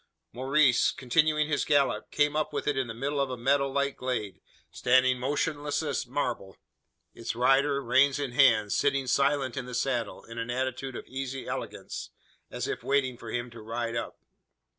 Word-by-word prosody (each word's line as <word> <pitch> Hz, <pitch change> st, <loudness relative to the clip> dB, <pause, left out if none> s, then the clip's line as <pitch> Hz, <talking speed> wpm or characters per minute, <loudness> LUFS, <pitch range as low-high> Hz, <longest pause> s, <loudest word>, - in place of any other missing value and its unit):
Maurice, 130 Hz, +1 st, +3 dB
continuing 150 Hz, +3 st, +2 dB
his 145 Hz, -2 st, 0 dB
gallop, 145 Hz, -2 st, +1 dB
came 150 Hz, 0 st, +1 dB
up 155 Hz, 0 st, 0 dB
with -, -, -2 dB
it 145 Hz, -, +2 dB
in 135 Hz, -2 st, -1 dB
the 115 Hz, -, -5 dB
middle 140 Hz, +4 st, -1 dB
of 135 Hz, -, 0 dB
a 125 Hz, -, -4 dB
meadow 140 Hz, +3 st, +2 dB
like 140 Hz, 0 st, -1 dB
glade 115 Hz, -6 st, -3 dB, 0.3 s
standing 130 Hz, 0 st, +3 dB
motionless 145 Hz, +3 st, -1 dB
as 145 Hz, -4 st, -2 dB
marble 120 Hz, -8 st, -3 dB, 0.6 s
its 115 Hz, 0 st, -5 dB
rider, 135 Hz, +3 st, +3 dB
reins 135 Hz, +3 st, +4 dB
in 140 Hz, -3 st, -3 dB
hand, 115 Hz, -5 st, +4 dB
sitting 140 Hz, -1 st, +1 dB
silent 140 Hz, 0 st, +1 dB
in 130 Hz, -3 st, -4 dB
the 125 Hz, -, -5 dB
saddle, 125 Hz, -3 st, -2 dB
in 115 Hz, 0 st, -8 dB
an 115 Hz, +1 st, -4 dB
attitude 130 Hz, +1 st, -3 dB
of -, -, -7 dB
easy 135 Hz, 0 st, -5 dB
elegance, -, -, -5 dB, 0.4 s
as -, -, -4 dB
if -, -, -3 dB
waiting 135 Hz, -2 st, +1 dB
for 115 Hz, -1 st, -10 dB
him 120 Hz, +1 st, -3 dB
to 115 Hz, -1 st, -11 dB
ride 115 Hz, +1 st, -3 dB
up! -, -, -4 dB
130 Hz, 180 wpm, -28 LUFS, 120-140 Hz, 0.6 s, reins